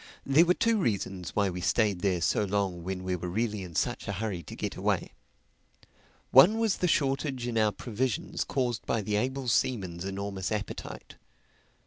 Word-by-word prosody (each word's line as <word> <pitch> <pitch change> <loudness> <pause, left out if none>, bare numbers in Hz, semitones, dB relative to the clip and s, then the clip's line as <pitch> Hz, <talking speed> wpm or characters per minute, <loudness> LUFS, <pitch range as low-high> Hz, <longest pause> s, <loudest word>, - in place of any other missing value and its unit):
There 145 +5 +5
were 180 +1 +3
two 230 -1 +2
reasons 95 - -2
why 100 -2 +2
we 90 0 -5
stayed 105 -1 +2
there 90 -3 +1
so 105 +5 +2
long 95 -3 -1
when 95 +1 -4
we 95 0 -1
were 90 0 -4
really 105 +2 -1
in 90 -3 -8
such - - -1
a 100 - -2
hurry 100 -3 -3
to 75 - -10
get - - -4
away. - - -1 1.2
One 170 - +8
was 225 -3 +1
the 180 - +1
shortage 135 -4 0
in 120 -1 -3
our 110 -1 +3
provisions 120 +3 -2
caused 125 -4 -1
by 115 - +1
the 105 +1 -1
able 130 +4 -1
seaman's 95 -8 0
enormous 100 0 -4
appetite. 105 -1 -5
105 Hz, 175 wpm, -29 LUFS, 95-130 Hz, 1.2 s, One